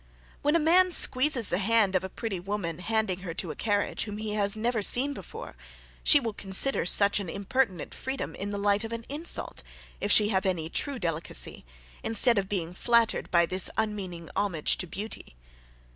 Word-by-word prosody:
When 295 +2 +1
a - - +3
man 360 +4 +3
squeezes 255 -7 +5
the 180 - -1
hand 210 -2 +1
of 185 - 0
a 190 - -6
pretty 200 -2 -6
woman, 180 -3 -5
handing 220 -2 -2
her 175 -3 -8
to 175 -3 -3
a - - -9
carriage, 205 -2 -2
whom 210 -1 -7
he 215 0 -5
has 205 -1 +1
never 225 +1 -2
seen 265 +7 +3
before, - - -10 0.5
she 295 - +6
will 230 -5 -5
consider 195 +3 +2
such 200 +2 +5
an 195 -4 -6
impertinent 200 - -3
freedom 265 +1 -6
in 200 - -5
the 205 - -5
light 205 +1 0
of 225 - -7
an 230 0 -7
insult, 305 +4 0 0.4
if 205 - -2
she 210 0 +5
have 190 -2 -1
any 165 -3 -3
true 285 -2 -2
delicacy, 165 - -3 0.4
instead 225 0 +4
of 195 -1 -5
being 175 -4 -4
flattered 235 +4 0
by 170 -1 +3
this 185 +2 +3
unmeaning 195 -6 -4
homage 175 -7 +1
to 180 - -4
beauty. 200 - -8
205 Hz, 190 wpm, -26 LUFS, 185-230 Hz, 0.5 s, she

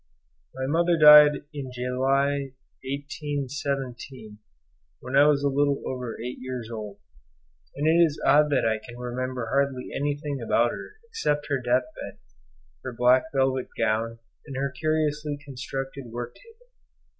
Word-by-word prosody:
My 130 0 -3
mother 170 +4 +2
died 150 -1 +8
in 135 -3 -6
July 135 +2 0 0.3
1817, 140 -4 -5 0.6
when 130 +2 -5
I 145 +1 +7
was 145 -1 +3
a - - +3
little 140 0 +1
over 125 -3 -5
eight 125 +2 -6
years 125 -3 -6
old, 105 -3 -7 0.8
and 145 - -2
it 170 +2 +5
is 155 -3 0
odd 150 +1 +5
that 140 -3 +1
I 110 -1 0
can 120 -1 -11
remember 125 0 -4
hardly 140 -1 0
anything 145 -1 -2
about 115 +1 +2
her - - -8
except 150 - -2
her 140 -2 +1
death 125 +1 +2 0.2
bed, - - -8 0.7
her 130 - -5
black 125 +3 +4
velvet 130 -2 +1
gown, 115 +1 0 0.3
and 135 - -7
her 135 +1 -1
curiously 150 +1 -1
constructed 135 0 -6
work 120 +1 -6
table. 480 +2 -21
135 Hz, 145 wpm, -26 LUFS, 125-145 Hz, 0.8 s, died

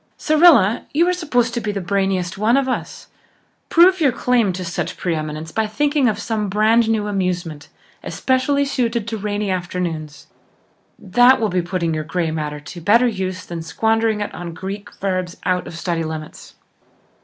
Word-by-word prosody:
Cyrilla, 300 - +4
you 335 +3 +4
are 360 - +2
supposed 245 -10 0
to 235 - -2
be 210 - -2
the 200 - -3
brainiest 190 -1 -1
one 220 +6 +2
of 275 -1 +1
us. 255 - -4 0.6
Prove 360 +2 +5
your 280 -4 +4
claim 240 -4 +1
to 185 0 -5
such 170 - -4
pre 175 - -1
eminence 155 0 -5
by 220 +3 0
thinking 285 +3 +1
of 210 - -2
some 210 -1 -2
brand 220 +3 +3
new 220 -2 +1
amusement, 180 -6 -3 0.3
especially 270 +2 0
suited 235 -5 -1
to 230 - -3
rainy 205 0 -2
afternoons. 175 -4 -4 0.7
That 245 +7 +4
will 220 -2 0
be 180 0 0
putting 170 -2 -2
your 155 0 -2
grey 165 0 -2
matter 150 -2 -4
to 170 +4 -10
better 230 +8 +4
use 185 -4 -3
than 170 -1 -6
squandering 220 +4 0
it 205 - -4
on 170 -2 -7
Greek 195 +4 -6
verbs 185 -2 -3
out 180 -1 0
of 165 - -8
study 170 -1 -2
limits." 155 -1 -8
200 Hz, 175 wpm, -20 LUFS, 175-235 Hz, 0.7 s, Prove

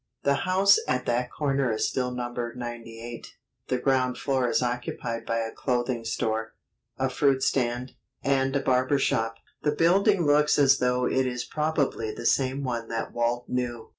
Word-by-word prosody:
The 140 - +3 0.2
house 195 +2 +5
at 125 0 0
that 120 +1 0
corner 140 -4 0
is 110 - 0
still 125 -1 -1
numbered 120 -1 -4
98. 120 -1 -8 0.3
The 130 - 0
ground 130 -1 +1
floor 130 -3 0
is 125 - +1
occupied 120 -1 -3
by 115 - 0
a 115 0 -3
clothing 120 -2 -1
store, 110 0 -2 0.4
a 130 - +1
fruit 130 +1 +2
stand, 125 0 0 0.3
and 135 0 +1
a 140 - +2
barber 130 +2 +2
shop. 115 -4 0 0.3
The 150 - 0
building 190 +2 +3
looks 150 +1 +4
as 140 -1 +5
though 125 0 +1
it 130 0 +1
is 125 -1 -3
probably 150 -7 -1
the 115 - -8
same 135 +3 +1
one 120 -3 -3
that 115 -1 -4
Walt 120 +1 -1
knew. 120 -2 -3
125 Hz, 165 wpm, -26 LUFS, 120-135 Hz, 0.4 s, house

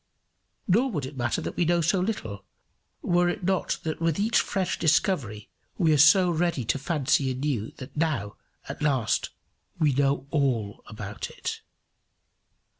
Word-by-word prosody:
Nor 230 +8 +3
would 150 - -3
it 135 +2 -8
matter 120 -1 -1
that - - -5
we - - +1
know 175 +1 +2
so 170 +4 +2
little, 180 - -3 0.6
were 175 0 +2
it 180 - -4
not 190 0 0
that 160 0 -4
with 165 -2 +1
each 220 +3 +3
fresh 190 -2 -1
discovery 145 - +1 0.3
we 165 -5 +3
are - - +3
so 175 +5 +6
ready 165 -6 0
to 140 - 0
fancy 140 -2 +1
anew 130 -4 -2
that 130 - -10
now, 140 -10 -1 0.3
at - - -7
last, 135 -7 +1 0.5
we 155 -4 +2
know 140 0 +1
all 125 -9 0
about 105 -2 -6
it. - - -5
150 Hz, 155 wpm, -26 LUFS, 130-175 Hz, 0.6 s, so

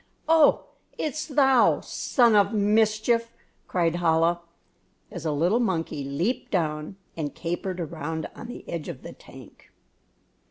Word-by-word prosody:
"Oh, 320 -2 +4 0.3
it's 305 0 -3
thou, 270 -4 +4
son 235 -4 +2
of 200 +1 +4
mischief!" 215 +2 +2 0.4
cried 170 -2 0
Chola, 165 0 +2 0.7
as 170 -3 -5
a - - +1
little 175 +10 +2
monkey 165 - -1
leaped 160 - -2
down 155 -1 -2 0.2
and 150 -3 -4
capered 180 +2 -4
around 160 -1 -4
on - - -9
the 245 - -9
edge 165 -3 -5
of - - -8
the - - -8
tank. - - -16
185 Hz, 130 wpm, -25 LUFS, 165-230 Hz, 0.7 s, Oh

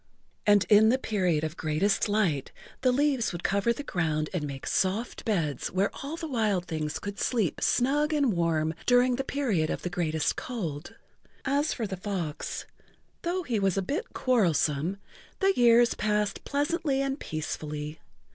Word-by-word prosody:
And 205 -1 +5
in 215 +1 +6
the 255 - +4
Period 180 -11 0
of 155 +1 -3
Greatest 185 +8 +1
Light 180 -10 +1 0.3
the 255 -1 +4
leaves 270 -2 +1
would 175 -1 -6
cover 200 +4 +2
the 260 +5 -3
ground 155 - -1
and 155 -5 -2
make 135 -1 -7
soft 200 +6 -1
beds 165 - 0
where 190 +2 0
all 285 +3 -4
the 330 - -5
wild 215 - 0
things 155 -3 -3
could 200 0 -6
sleep 220 - 0
snug 290 +5 +2
and 285 -7 +2
warm 160 -2 +1
during 245 0 +4
the 270 - -1
Period 230 - 0
of - - -3
Greatest 160 -3 0
Cold. 175 - -5 0.5
As 285 +3 +1
for 230 - -2
the 190 -2 -4
fox, 180 -5 -4 0.6
though 360 +2 -1
he 235 -8 -1
was 195 -1 +1
a 195 - +1
bit 355 - -3
quarrelsome, 175 - +1 0.4
the 390 0 +3
years 240 0 +5
passed 210 -1 -1
pleasantly 285 -1 0
and 275 +1 -2
peacefully. 150 -1 -5
205 Hz, 160 wpm, -28 LUFS, 160-255 Hz, 0.6 s, in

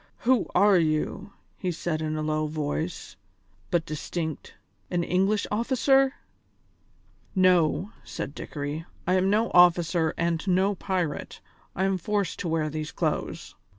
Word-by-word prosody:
"Who 250 -3 +3
are 200 0 +6
you?" 165 +5 -1 0.3
he 185 - -1
said 160 -1 -3
in 155 0 -2
a 155 - -2
low 155 0 0
voice, 155 - -4 0.5
but 170 -2 +1
distinct, 160 0 -5 0.3
"an 175 -1 0
English 195 +4 +1
officer?" 265 +4 +3 1.2
"No," 185 +1 +3
said 140 - -6
Dickory, 145 +3 -5 0.2
"I 180 - +2
am 185 +1 +3
no 220 +3 +2
officer 175 -2 +4
and 170 -1 0
no 190 +2 +3
pirate; 180 -5 -3 0.4
I 190 - 0
am 190 -1 +1
forced 205 +2 -1
to - - -3
wear 160 -1 0
these 155 0 -4
clothes." - - -3
175 Hz, 135 wpm, -26 LUFS, 155-195 Hz, 1.2 s, are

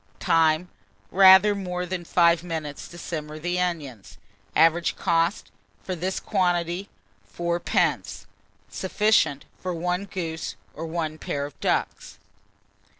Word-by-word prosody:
Time. 165 +1 +2 0.4
Rather 190 +2 +7
more 180 -2 -3
than 180 -1 -4
5 170 -1 +3
minutes 160 -4 -5
to 175 - -12
simmer 155 -3 -6
the 175 +3 -2
onions. 150 - -4 0.4
Average 165 +2 +3
cost, 170 +3 0 0.3
for 185 - -4
this 185 +2 -2
quantity, 180 -1 0 0.5
4d. 170 - 0 0.4
Sufficient 190 -7 +1
for 180 -1 -3
1 180 +3 -2
goose, 165 - -5 0.2
or 165 +1 -3
a 155 0 -7
pair 140 0 -3
of 145 - -11
ducks. - - -2
170 Hz, 115 wpm, -25 LUFS, 160-180 Hz, 0.5 s, Rather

